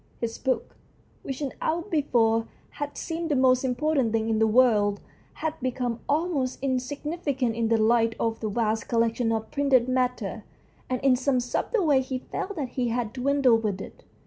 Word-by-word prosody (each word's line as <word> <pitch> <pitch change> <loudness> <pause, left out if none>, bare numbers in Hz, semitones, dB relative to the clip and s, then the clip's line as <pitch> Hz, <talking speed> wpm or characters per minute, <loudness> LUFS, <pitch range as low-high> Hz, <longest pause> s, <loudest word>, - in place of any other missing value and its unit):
His 230 -1 -4
book, 260 -1 -1 0.5
which 270 +1 -6
an 280 -3 -2
hour 335 +2 0
before 235 - +1 0.2
had 290 0 -6
seemed 330 0 -3
the 295 - +2
most 255 -1 +4
important 265 -1 +1
thing 225 0 0
in 220 - +1
the 220 - +4
world, 215 -4 +3 0.3
had 315 0 -3
become 245 -2 -2
almost 290 -4 0
insignificant 270 -1 -2
in 230 -1 0
the 230 0 +3
light 225 +1 +3
of 225 -1 -1
that 215 - -2
vast 220 +1 -1
collection 230 0 +1
of 220 -1 -2
printed 270 -4 +3
matter, 250 -5 -1 0.5
and 255 -1 -1
in 270 -2 +4
some 260 0 +1
subtle 340 - -1
way 280 -4 +4
he 260 0 -3
felt 380 +9 -5
that 285 -6 -3
he 250 0 -1
had 230 -2 -2
dwindled 260 -3 +3
with 200 -3 -1
it. - - -10
255 Hz, 175 wpm, -26 LUFS, 230-280 Hz, 0.5 s, most